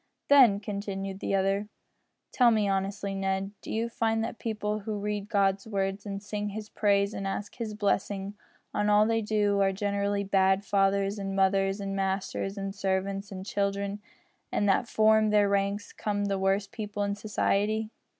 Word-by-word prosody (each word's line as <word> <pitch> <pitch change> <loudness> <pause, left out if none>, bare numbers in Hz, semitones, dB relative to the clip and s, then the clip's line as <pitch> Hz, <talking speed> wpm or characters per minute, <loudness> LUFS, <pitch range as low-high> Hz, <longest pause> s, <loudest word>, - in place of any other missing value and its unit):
"Then," 255 -8 +7
continued 195 -1 -4
the 195 - -1
other, 195 +2 +1 0.6
"tell 245 -2 +5
me, 215 -3 +2
honestly, 195 +1 -1
Ned, 195 0 -1
do - - -7
you 225 +1 0
find 225 -2 0
that 230 - -5
people 215 -2 -2
who 210 0 -4
read 205 0 -3
God's 195 -1 +1
Word 195 -1 -2
and 200 0 -5
sing 205 0 -3
His 210 +1 -7
praise 200 -1 +2
and 195 - -4
ask 200 +1 -4
His 220 -3 -4
blessing 200 -1 -1 0.4
on 205 0 +1
all 210 +1 +5
they 225 0 +1
do, 205 -1 +1
are 195 0 +3
generally 200 +1 -1
bad 190 0 +2
fathers, 195 +1 +1
and 195 -1 -3
mothers, 195 +1 +2
and 195 0 -3
masters, 195 +1 -2
and 195 0 -4
servants, 195 0 -2
and 190 -1 -7
children, 200 0 -2 0.5
and 205 - +1
that 200 +4 +2
from 220 0 +4
their 210 -1 +4
ranks 200 +1 -1
come 205 -1 -2
the 195 -1 -1
worst 195 +1 +1
people 210 -3 -4
in 200 0 0
society?" 215 +1 0
200 Hz, 170 wpm, -28 LUFS, 195-210 Hz, 0.6 s, Then